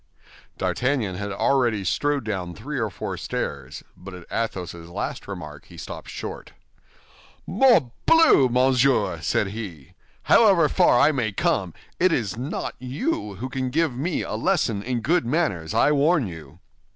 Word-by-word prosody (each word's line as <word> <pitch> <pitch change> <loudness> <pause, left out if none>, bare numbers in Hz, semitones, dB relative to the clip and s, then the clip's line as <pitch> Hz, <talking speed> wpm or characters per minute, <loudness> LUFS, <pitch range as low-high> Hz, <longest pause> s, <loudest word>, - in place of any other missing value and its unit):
D'Artagnan 125 -7 -1
had 100 +2 -5
already 115 -1 +1
strode 140 - 0
down 95 -5 -4
three 135 +6 -5
or 110 -2 -1
four 90 - -5
stairs, 70 0 -5
but 90 +1 -10
at 90 -2 -11
Athos's 90 -6 -4
last - - -5
remark 75 -1 -8
he - - -15
stopped - - -8
short. - - -7 0.9
"Morbleu, 235 - +4
monsieur!" 125 -7 +2
said 95 +6 0
he, 95 -10 -8 0.3
"however 195 -8 +5
far 120 - +4
I 155 - +5
may 125 -7 -1
come, 105 - -1 0.2
it 185 0 +4
is 115 - -1
not 130 +7 -4
you 130 - -3
who 120 +7 -5
can 130 -1 -3
give 160 +1 +1
me 155 +8 -2
a - - -5
lesson 155 - 0
in 120 +2 -2
good 165 +9 +2
manners, 115 - -1
I - - +3
warn 150 0 +3
you." 85 -5 -10
120 Hz, 150 wpm, -24 LUFS, 95-145 Hz, 0.9 s, however